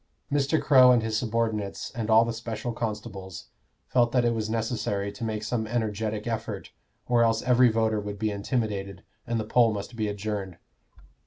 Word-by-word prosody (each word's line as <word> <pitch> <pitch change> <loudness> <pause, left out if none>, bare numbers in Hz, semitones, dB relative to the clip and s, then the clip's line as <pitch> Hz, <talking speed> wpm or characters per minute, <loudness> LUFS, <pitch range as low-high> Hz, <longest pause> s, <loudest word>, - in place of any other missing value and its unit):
Mr. 145 +2 +2
Crow 130 -3 +7
and 120 -2 +3
his 110 -1 -2
subordinates, 110 -3 -2
and 115 -3 -4
all 110 +1 +6
the 115 - -2
special 115 +1 -4
constables, 105 -5 -6 0.4
felt 120 -2 +2
that 125 -2 +3
it 120 - +2
was 110 -1 -2
necessary 110 -3 -2
to 105 +3 -8
make 110 -1 -2
some 110 0 -2
energetic 110 -2 -2
effort, 110 -3 -4 0.4
or 120 -1 +3
else 115 -1 +2
every 125 0 +5
voter 110 -1 +1
would 105 0 -5
be 110 0 -1
intimidated 100 -2 -3 0.2
and 115 -1 0
the - - -1
poll 115 0 +4
must 105 +3 -5
be 110 -2 -1
adjourned. 100 -3 -4
110 Hz, 175 wpm, -27 LUFS, 105-120 Hz, 0.4 s, Crow